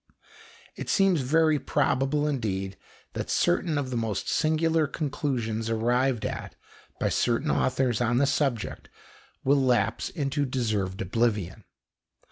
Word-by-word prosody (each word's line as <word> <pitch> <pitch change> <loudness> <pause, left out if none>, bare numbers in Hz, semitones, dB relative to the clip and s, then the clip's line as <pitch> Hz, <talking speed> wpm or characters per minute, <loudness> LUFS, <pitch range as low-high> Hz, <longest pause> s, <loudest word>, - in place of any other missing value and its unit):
It - - -6
seems 195 -6 +3
very 155 +3 +3
probable 145 +1 +1
indeed 100 -9 -2 0.4
that - - -4
certain 175 -3 +1
of 135 -3 -2
the - - -2
most 110 -4 -2
singular 160 0 +2
conclusions 125 -7 -2
arrived 120 +1 +1
at - - -5 0.4
by - - +1
certain 125 +6 +1
authors 130 -3 +1
on 120 0 +2
the 140 - +4
subject 135 -6 -1 0.5
will 140 +1 +3
lapse 115 -4 +1
into 145 -2 -1
deserved 110 -8 -1
oblivion. 105 -1 -1
130 Hz, 120 wpm, -27 LUFS, 115-145 Hz, 0.5 s, the